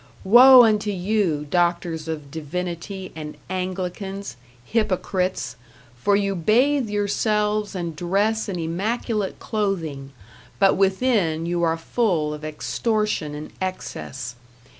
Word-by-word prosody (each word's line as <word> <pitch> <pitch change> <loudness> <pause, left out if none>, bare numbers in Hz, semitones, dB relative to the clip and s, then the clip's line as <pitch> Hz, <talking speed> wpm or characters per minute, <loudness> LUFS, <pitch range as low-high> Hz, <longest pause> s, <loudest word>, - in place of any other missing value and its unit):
Woe 250 +5 +9
unto 215 -2 +2
you, 185 -5 0
doctors 170 -2 0
of 150 -3 -5
divinity 180 +4 -5
and 150 -1 -7
Anglicans, 185 - -4 0.3
hypocrites! 185 - -1 0.4
for 200 +12 +2
you 200 -1 +1
bathe 240 - +2
yourselves 210 0 0
and 170 -3 -4
dress 205 +7 0
in 185 - -3
immaculate 200 +5 -2
clothing 165 -10 -3 0.5
but 195 -1 +4
within 190 -5 +1
you 175 0 -1
are 165 -1 +2
full 165 -4 0
of 150 0 -8
extortion 170 +1 -1
and 150 +1 -8
excess. 130 -9 -5
185 Hz, 110 wpm, -23 LUFS, 160-210 Hz, 0.5 s, Woe